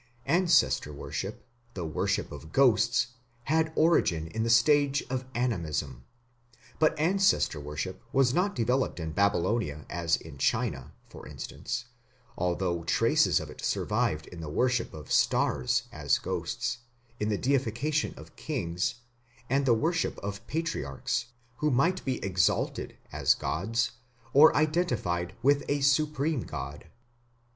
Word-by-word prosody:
Ancestor 170 - +3
worship, 70 - -6 0.3
the 90 -3 -3
worship 100 +6 -1
of 75 +1 -10
ghosts, 120 -1 +3 0.3
had 160 +3 +1
origin 100 - +3
in 110 +6 -3
the 115 - 0
stage 140 +4 +4
of 130 -1 -2
Animism. 80 - -2 0.7
But 155 0 +3
ancestor 185 - +2
worship 75 +6 -5
was 135 -2 +3
not 195 +5 +1
developed 125 -1 0
in 80 -1 -4
Babylonia 100 - 0
as 85 -1 +1
in 70 - -12
China, - - 0 0.2
for - - -12
instance, 125 0 -5 0.5
although 85 -1 -1
traces 85 - +3
of - - -7
it - - -11
survived 75 0 0
in 85 -2 -10
the 80 - -6
worship 120 +7 +1
of 75 -3 -10
stars - - +2
as - - +1
ghosts, - - -3 0.4
in 105 - 0
the 105 - +1
deification 135 +4 0
of - - -13
kings, 90 - -2 0.6
and 140 0 +2
the 120 - +5
worship 165 +7 0
of 100 0 -6
patriarchs, 135 -6 -2 0.3
who 150 - +1
might 160 +8 +2
be 130 -2 -1
exalted 90 -2 0
as - - +3
gods 115 +8 -1 0.4
or 150 +3 +8
identified 120 - 0
with 140 +1 +4
a 145 0 +1
supreme 145 0 +2
god. 70 0 -7
120 Hz, 130 wpm, -29 LUFS, 85-145 Hz, 0.7 s, or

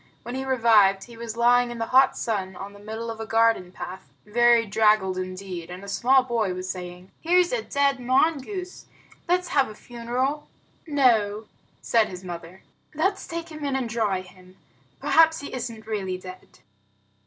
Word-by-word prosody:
When 240 - -6
he 265 +1 -3
revived, 225 -7 +4
he 235 - -13
was 230 0 -7
lying 245 +1 +4
in 240 - -6
the 225 - -2
hot 265 +1 +5
sun 190 -4 -2
on 195 +2 -8
the 205 - -14
middle 220 +2 -5
of 225 - -9
a 225 - -5
garden 225 -5 +2
path, 185 0 -9
very 235 +2 +4
draggled 210 -2 +3
indeed, 185 -2 -6
and 180 +2 -8
a - - -9
small 255 +6 +3
boy 225 -7 -1
was 185 0 -5
saying, 180 0 -7
"Here's 355 +1 +3
a - - 0
dead 280 -6 +1
mongoose. 315 +8 -1 0.4
Let's 360 +1 +1
have 275 -4 +2
a 215 - -10
funeral." 245 +6 -3 0.4
"No," 225 -8 +2 0.4
said 225 -2 +3
his 185 0 -9
mother, 175 +1 -9 0.3
"let's 380 +6 0
take 335 0 -5
him 305 -2 -9
in 280 -2 -1
and 260 -3 -1
dry 215 -5 0
him. 185 0 -17 0.4
Perhaps 320 -1 +4
he 285 - -8
isn't 230 -3 -5
really 195 -4 -3
dead." 185 0 -11
230 Hz, 175 wpm, -25 LUFS, 195-265 Hz, 0.4 s, hot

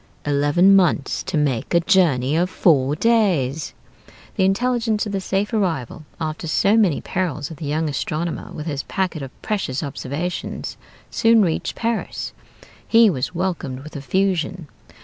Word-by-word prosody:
Eleven 145 +7 +4
months 175 -7 +2
to 185 -4 -3
make 145 0 0
a - - +7
journey 160 -7 +2
of 175 +2 +1
four 145 -7 +3
days! 170 - +1 0.6
The 190 - +2
intelligence 225 +1 +1
of 210 - -4
the 195 -1 -2
safe 195 +4 -1
arrival, 165 - -1
after 160 +1 -4
so 200 +6 +3
many 200 -9 +3
perils, 170 -5 -3
of 160 - -9
the 155 - -6
young 155 +2 0
astronomer, 155 +3 -3
with 150 - -7
his 145 -4 -2
packet 180 -3 -2
of 135 -1 -10
precious 190 - -2
observations, 145 +5 -4 0.4
soon 225 -2 +4
reached 165 -4 -1
Paris. 230 -1 -3 0.5
He 230 -2 +6
was 135 +3 -3
welcomed 170 -8 -3
with 155 - -11
effusion. 180 +2 -1
170 Hz, 150 wpm, -21 LUFS, 145-195 Hz, 0.6 s, a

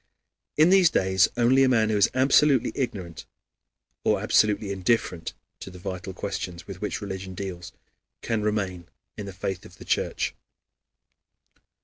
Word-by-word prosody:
In 155 +4 +6
these 190 -3 +6
days 95 - +3
only 125 +3 +4
a 130 - +4
man 110 -3 +3
who - - +1
is 100 - +4
absolutely 135 0 +4
ignorant 95 - -4 0.8
or - - +2
absolutely 105 -1 +2
indifferent 95 -3 -1 0.2
to - - -8
the 90 - -12
vital 95 0 -6
questions 90 -2 -5
with 95 -2 -9
which 105 - -3
religion 95 -2 -6
deals, 90 -2 -6 0.5
can 115 -2 -1
remain 100 -5 -2 0.3
in 105 - -7
the - - -6
faith 95 0 -4
of 90 - -15
the - - -12
Church. - - -1
100 Hz, 145 wpm, -25 LUFS, 95-115 Hz, 0.8 s, In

